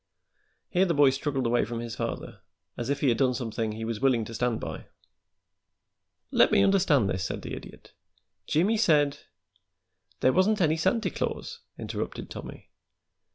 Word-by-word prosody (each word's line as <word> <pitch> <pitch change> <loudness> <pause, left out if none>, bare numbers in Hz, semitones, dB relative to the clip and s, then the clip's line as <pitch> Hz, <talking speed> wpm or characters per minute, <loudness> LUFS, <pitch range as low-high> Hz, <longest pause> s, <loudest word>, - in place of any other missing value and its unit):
Here 185 +1 +3
the 170 - +1
boy 145 -2 +6
struggled 135 -1 -2
away 120 +1 +2
from 115 -1 -4
his 115 -2 -5
father, - - -5 0.3
as 120 - -4
if 140 - -1
he 140 - +3
had 115 - +1
done 130 -2 +3
something 115 -3 -3
he 110 +1 -5
was 115 -1 -3
willing 125 -5 +2
to 115 - -8
stand 120 -1 0
by. - - -7 1.4
"Let - - +5
me 100 - +5
understand 165 - +3
this," 90 -1 -2
said - - -4
the - - -6
Idiot. - - -10 0.5
"Jimmie 190 +9 +2
said 150 -9 +3 0.5
" 90 0 -42
"There 130 - +4
wasn't 205 +4 +3
any 160 -3 +3
Santy 225 +8 +1
Claus," - - -4 0.2
interrupted - - -5
Tommy. - - -9
130 Hz, 165 wpm, -27 LUFS, 115-155 Hz, 1.4 s, boy